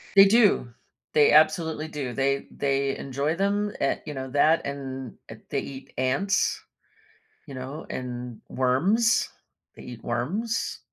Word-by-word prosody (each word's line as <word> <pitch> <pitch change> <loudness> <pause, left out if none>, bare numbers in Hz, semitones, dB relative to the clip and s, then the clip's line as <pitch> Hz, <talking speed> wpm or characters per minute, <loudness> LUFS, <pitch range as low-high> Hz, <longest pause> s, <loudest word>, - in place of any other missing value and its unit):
They 195 - +10
do. 200 - +3 0.4
They 150 -1 +5
absolutely 155 0 +3
do, 140 -5 -4
they 140 +1 0
they 135 -1 0
enjoy 140 +4 -2
them 205 +2 0
a - - +1
you 150 - -5
know, 130 -1 -5
that 155 +4 +3
and, 135 -3 -6
eh, 110 - -8
they 140 - 0
eat 135 0 -9
ants, 140 +11 +1 0.8
you 140 - -9
know, 135 +5 -7
and 125 -2 -6
worms. 185 - +2 0.5
They - - -12
eat 120 -2 -10
worms. 180 - -2
140 Hz, 135 wpm, -26 LUFS, 130-170 Hz, 0.8 s, They